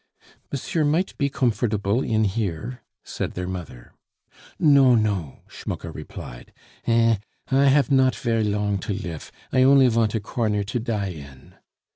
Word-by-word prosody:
"Monsieur 150 Hz, +3 st, -1 dB
might 160 Hz, +6 st, 0 dB
be 140 Hz, -1 st, +1 dB
comfortable 115 Hz, -5 st, 0 dB
in 110 Hz, -3 st, +1 dB
here," 105 Hz, +3 st, -3 dB, 0.2 s
said -, -, -4 dB
their 90 Hz, 0 st, -4 dB
mother. 85 Hz, -10 st, -8 dB, 0.6 s
"No, 140 Hz, -5 st, +5 dB
no," 100 Hz, -, -1 dB
Schmucke -, -, -6 dB
replied. -, -, -9 dB, 0.4 s
"Eh! 115 Hz, -1 st, +4 dB, 0.3 s
I 135 Hz, +1 st, +4 dB
haf 140 Hz, +1 st, +4 dB
not 130 Hz, -1 st, +4 dB
ver' 115 Hz, -2 st, 0 dB
long 105 Hz, -1 st, 0 dB
to 100 Hz, -, -3 dB
lif, 85 Hz, -6 st, -7 dB, 0.2 s
I 130 Hz, -, +4 dB
only 135 Hz, 0 st, +6 dB
vant 115 Hz, -1 st, +1 dB
a -, -, +1 dB
corner 105 Hz, -2 st, -1 dB
to 105 Hz, +5 st, -3 dB
die 110 Hz, -4 st, -2 dB
in." 70 Hz, -6 st, -11 dB
110 Hz, 145 wpm, -23 LUFS, 100-130 Hz, 0.6 s, only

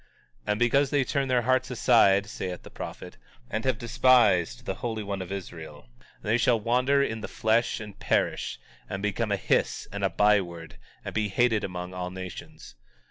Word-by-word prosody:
19:14 -, -, +2 dB
And 105 Hz, -, -1 dB
because 135 Hz, +4 st, +3 dB
they 140 Hz, -1 st, +2 dB
turn 135 Hz, +1 st, -1 dB
their 125 Hz, -1 st, +2 dB
hearts 130 Hz, +1 st, +1 dB
aside, 110 Hz, -5 st, +4 dB
saith 90 Hz, -3 st, -6 dB
the -, -, -12 dB
prophet, -, -, -8 dB, 0.3 s
and 110 Hz, -, -2 dB
have 130 Hz, -4 st, +1 dB
despised 110 Hz, -, +3 dB
the -, -, -2 dB
Holy 110 Hz, -3 st, -3 dB
One 100 Hz, -1 st, -4 dB
of 95 Hz, 0 st, -7 dB
Israel, 80 Hz, -8 st, -8 dB, 0.3 s
they 110 Hz, +3 st, +1 dB
shall 120 Hz, -1 st, +3 dB
wander 125 Hz, +5 st, +2 dB
in 110 Hz, -4 st, -3 dB
the -, -, -5 dB
flesh, 115 Hz, +3 st, +1 dB
and 105 Hz, -2 st, -10 dB
perish, -, -, 0 dB, 0.3 s
and 95 Hz, +1 st, -4 dB
become 105 Hz, +1 st, -1 dB
a 100 Hz, -, +2 dB
hiss -, -, 0 dB
and 100 Hz, 0 st, -5 dB
a 95 Hz, -, +3 dB
byword, 85 Hz, -8 st, +1 dB, 0.3 s
and -, -, -5 dB
be 110 Hz, -1 st, 0 dB
hated 110 Hz, +1 st, +2 dB
among 90 Hz, -1 st, -5 dB
all 90 Hz, 0 st, -4 dB
nations. 90 Hz, -8 st, -9 dB
105 Hz, 185 wpm, -27 LUFS, 95-120 Hz, 0.3 s, aside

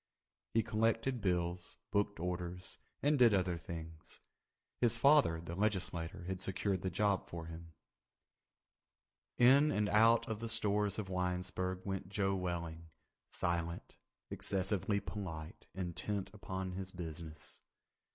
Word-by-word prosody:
He 115 Hz, -, +4 dB
collected 115 Hz, +4 st, +1 dB
bills, 90 Hz, -2 st, -1 dB
booked 100 Hz, -2 st, +1 dB
orders, 90 Hz, +1 st, -4 dB, 0.2 s
and 145 Hz, 0 st, +3 dB
did 115 Hz, -4 st, +7 dB
other 90 Hz, -2 st, +1 dB
things. 80 Hz, 0 st, -7 dB, 0.6 s
His 120 Hz, -2 st, +4 dB
father, 140 Hz, -, +5 dB
the 85 Hz, 0 st, -6 dB
legislator, 90 Hz, -4 st, -1 dB
had 95 Hz, +1 st, -4 dB
secured 95 Hz, 0 st, -1 dB
the 95 Hz, -, -1 dB
job 100 Hz, +1 st, +1 dB
for 85 Hz, -1 st, -6 dB
him. 85 Hz, 0 st, -9 dB, 1.6 s
In 135 Hz, +5 st, +7 dB
and 105 Hz, -7 st, +1 dB
out 115 Hz, +2 st, +5 dB
of 110 Hz, -2 st, -3 dB
the 115 Hz, 0 st, -3 dB
stores 105 Hz, -2 st, +2 dB
of 100 Hz, -3 st, -4 dB
Winesburg 90 Hz, 0 st, -1 dB
went 95 Hz, -2 st, -3 dB
Joe 95 Hz, -1 st, +1 dB
Welling—silent, 85 Hz, -1 st, -4 dB, 0.4 s
excessively 100 Hz, +1 st, 0 dB
polite, 90 Hz, -5 st, -6 dB
intent 95 Hz, +2 st, -3 dB
upon 95 Hz, -2 st, -4 dB
his 95 Hz, 0 st, -5 dB
business. 80 Hz, -3 st, -7 dB
95 Hz, 120 wpm, -35 LUFS, 85-105 Hz, 1.6 s, did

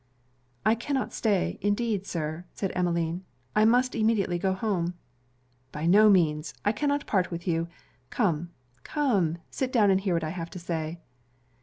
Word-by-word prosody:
'I 220 Hz, -, +5 dB
cannot 270 Hz, 0 st, -1 dB
stay, 205 Hz, -5 st, 0 dB
indeed 205 Hz, -1 st, 0 dB
Sir,' 160 Hz, 0 st, -3 dB
said 195 Hz, -, -2 dB
Emmeline. 170 Hz, 0 st, 0 dB, 0.3 s
'I 215 Hz, -, +5 dB
must 250 Hz, +3 st, +3 dB
immediately 215 Hz, -6 st, +1 dB
go 190 Hz, +1 st, +1 dB
home.' 185 Hz, -3 st, -1 dB, 0.8 s
'By 150 Hz, +1 st, -4 dB
no 210 Hz, +5 st, +7 dB
means; 160 Hz, -5 st, +2 dB
I 205 Hz, -, +4 dB
cannot 285 Hz, +5 st, 0 dB
part 185 Hz, -3 st, +1 dB
with 170 Hz, +1 st, -6 dB
you. 165 Hz, -1 st, +1 dB, 0.4 s
Come, 175 Hz, -7 st, 0 dB, 0.3 s
come, 195 Hz, -, +1 dB
sit 260 Hz, -1 st, -2 dB
down 215 Hz, -6 st, +4 dB
and 190 Hz, 0 st, +3 dB
hear 190 Hz, -3 st, 0 dB
what 165 Hz, -, 0 dB
I 155 Hz, -, -2 dB
have 170 Hz, -2 st, -5 dB
to 185 Hz, -, -9 dB
say.' 165 Hz, -1 st, -4 dB
190 Hz, 160 wpm, -27 LUFS, 170-215 Hz, 0.8 s, no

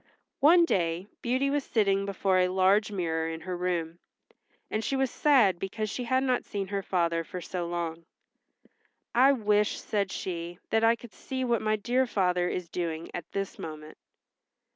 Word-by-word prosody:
One 335 Hz, +4 st, +6 dB
day 175 Hz, -, 0 dB, 0.2 s
Beauty 260 Hz, +3 st, +1 dB
was 290 Hz, -1 st, 0 dB
sitting 200 Hz, -4 st, +1 dB
before 190 Hz, -1 st, +1 dB
a 180 Hz, -, +4 dB
large 190 Hz, +3 st, +3 dB
mirror 165 Hz, -4 st, -1 dB
in 160 Hz, 0 st, -6 dB
her 180 Hz, +2 st, -4 dB
room, 175 Hz, -2 st, -2 dB, 0.7 s
and 215 Hz, -, -1 dB
she 275 Hz, -, -1 dB
was 265 Hz, -1 st, +1 dB
sad 235 Hz, -, +4 dB
because 210 Hz, +3 st, -3 dB
she 250 Hz, -, -4 dB
had 260 Hz, +2 st, +2 dB
not 255 Hz, -2 st, +1 dB
seen 195 Hz, -2 st, -4 dB
her 200 Hz, -1 st, -1 dB
father 170 Hz, -3 st, 0 dB
for 180 Hz, +3 st, -7 dB
so 175 Hz, 0 st, -4 dB
long. 170 Hz, -1 st, -4 dB, 1.1 s
"I 260 Hz, +3 st, +6 dB
wish," 210 Hz, -3 st, +1 dB
said 200 Hz, -3 st, -1 dB
she, 170 Hz, -1 st, -5 dB
"that 225 Hz, 0 st, +2 dB
I 230 Hz, +1 st, +5 dB
could 235 Hz, -3 st, -13 dB
see 260 Hz, -1 st, -4 dB
what 235 Hz, -2 st, +1 dB
my 215 Hz, 0 st, +1 dB
dear 245 Hz, +5 st, +1 dB
father 180 Hz, -4 st, +1 dB
is 180 Hz, -2 st, -3 dB
doing 165 Hz, -2 st, -4 dB
at 175 Hz, -, -7 dB
this 195 Hz, -1 st, -4 dB
moment." 155 Hz, -1 st, -8 dB
195 Hz, 175 wpm, -28 LUFS, 175-230 Hz, 1.1 s, One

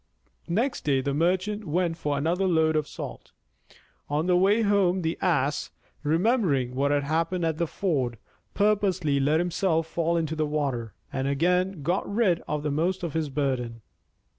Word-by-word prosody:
Next 230 Hz, +10 st, 0 dB
day 140 Hz, -3 st, +2 dB
the 140 Hz, +1 st, -1 dB
Merchant 185 Hz, +7 st, 0 dB
went 170 Hz, +2 st, 0 dB
for 145 Hz, -3 st, -2 dB
another 175 Hz, +6 st, +1 dB
load 160 Hz, -3 st, +3 dB
of 155 Hz, -2 st, 0 dB
salt. -, -, -8 dB, 0.8 s
On 150 Hz, +3 st, 0 dB
the 180 Hz, 0 st, +3 dB
way 200 Hz, +5 st, +4 dB
home 190 Hz, -3 st, +2 dB
the 160 Hz, +1 st, 0 dB
Ass, 150 Hz, -6 st, +1 dB, 0.3 s
remembering 160 Hz, -, +1 dB
what 140 Hz, +2 st, +1 dB
had 145 Hz, 0 st, +1 dB
happened 165 Hz, +4 st, 0 dB
at 160 Hz, -1 st, -1 dB
the 170 Hz, -, +1 dB
ford, 135 Hz, -, -1 dB, 0.4 s
purposely 195 Hz, -8 st, +2 dB
let 150 Hz, +3 st, +2 dB
himself 175 Hz, -1 st, +1 dB
fall 170 Hz, +1 st, 0 dB
into 160 Hz, -1 st, -1 dB
the 155 Hz, -1 st, 0 dB
water, 135 Hz, -7 st, -2 dB, 0.2 s
and 135 Hz, 0 st, -1 dB
again 180 Hz, +4 st, +1 dB
got 180 Hz, +6 st, -1 dB
rid 200 Hz, -6 st, +2 dB
of 150 Hz, 0 st, -3 dB
most 180 Hz, +5 st, 0 dB
of 170 Hz, -, -3 dB
his 160 Hz, -2 st, -1 dB
burden. 125 Hz, -5 st, -2 dB
165 Hz, 165 wpm, -26 LUFS, 145-185 Hz, 0.8 s, way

